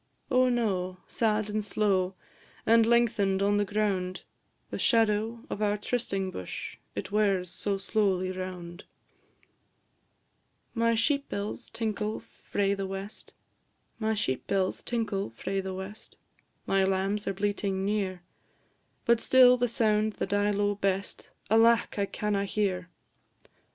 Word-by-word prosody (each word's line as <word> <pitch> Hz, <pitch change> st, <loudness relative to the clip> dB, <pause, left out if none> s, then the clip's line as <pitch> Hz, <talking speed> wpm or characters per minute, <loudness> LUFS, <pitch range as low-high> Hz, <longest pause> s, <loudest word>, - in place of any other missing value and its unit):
Oh, 255 Hz, 0 st, +4 dB
no! 190 Hz, -7 st, 0 dB
sad 215 Hz, -2 st, +1 dB
and 210 Hz, 0 st, -2 dB
slow, 195 Hz, -3 st, +1 dB, 0.5 s
And 225 Hz, 0 st, +5 dB
lengthen'd 215 Hz, -5 st, +3 dB
on 205 Hz, +1 st, +3 dB
the 205 Hz, -, +2 dB
ground; 195 Hz, -3 st, -1 dB, 0.5 s
The -, -, -4 dB
shadow 225 Hz, 0 st, +2 dB
of 210 Hz, -, -5 dB
our 210 Hz, 0 st, +2 dB
trysting 200 Hz, -4 st, -2 dB
bush 90 Hz, -, -6 dB, 0.2 s
It -, -, -5 dB
wears 195 Hz, -4 st, +1 dB
so 195 Hz, +2 st, -2 dB
slowly 195 Hz, -2 st, 0 dB
round. 185 Hz, -1 st, -7 dB, 1.9 s
My 230 Hz, -1 st, +2 dB
sheep 280 Hz, +5 st, +1 dB
bells 205 Hz, +4 st, -4 dB
tinkle 215 Hz, -1 st, -2 dB
frae 200 Hz, -1 st, -2 dB
the 195 Hz, -1 st, -3 dB
west, 195 Hz, +2 st, -7 dB, 0.6 s
My 220 Hz, 0 st, 0 dB, 2.7 s
lambs 195 Hz, +2 st, 0 dB
are 195 Hz, -, 0 dB
bleating 200 Hz, -1 st, -1 dB
near; 195 Hz, -3 st, -1 dB, 0.8 s
But 235 Hz, -1 st, +4 dB
still 255 Hz, -1 st, +7 dB
the 245 Hz, 0 st, +1 dB
sound 215 Hz, -2 st, +1 dB
that -, -, -3 dB
I 205 Hz, 0 st, +2 dB
lo'e 205 Hz, 0 st, 0 dB
best, 195 Hz, 0 st, -2 dB, 0.2 s
Alack! 230 Hz, 0 st, +4 dB
I 200 Hz, -, +1 dB
canna 205 Hz, -1 st, -1 dB
hear. 190 Hz, -3 st, -1 dB
205 Hz, 115 wpm, -29 LUFS, 195-220 Hz, 2.7 s, still